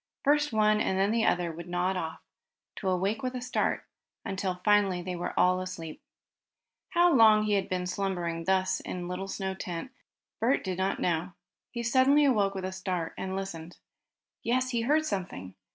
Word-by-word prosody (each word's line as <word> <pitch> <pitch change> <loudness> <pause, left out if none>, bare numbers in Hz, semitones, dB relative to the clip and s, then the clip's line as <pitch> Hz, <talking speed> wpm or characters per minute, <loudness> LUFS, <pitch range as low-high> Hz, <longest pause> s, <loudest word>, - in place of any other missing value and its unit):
First 295 0 +3
one 215 -1 +3
and 190 - 0
then 195 +2 +2
the 230 0 +2
other 175 -1 +1
would 170 +2 -9
nod 180 +2 0
off, 160 -3 -4 0.6
to 195 - -1
awake 195 +4 0
with 255 0 -3
a - - -2
start, 255 - -1 0.4
until 190 -2 -2
finally 205 -3 +4
they 180 0 -4
were 175 - -3
all 185 0 +4
asleep. 165 -4 -7 0.9
How 345 0 +4
long 220 -4 +6
he 210 -1 +1
had 200 -1 0
been 180 -1 -1
slumbering 175 -3 -2
thus, 190 0 +2
in 180 -1 -5
little 180 +2 -4
snow 190 -1 -3
tent, 180 +5 -6 0.5
Bert 250 +5 +2
did 185 -1 -3
not 190 +1 0
know. 175 +1 -1 0.4
He 235 -1 -5
suddenly 265 +5 +4
awoke 205 -7 +2
with 190 -1 -3
a 190 - -3
start, 185 -3 -3
and 190 0 -4
listened. 175 -3 -6 0.6
Yes, 255 +2 0
he 235 -2 0
heard 300 +6 +2
something! 180 - -4
190 Hz, 180 wpm, -29 LUFS, 180-220 Hz, 0.9 s, long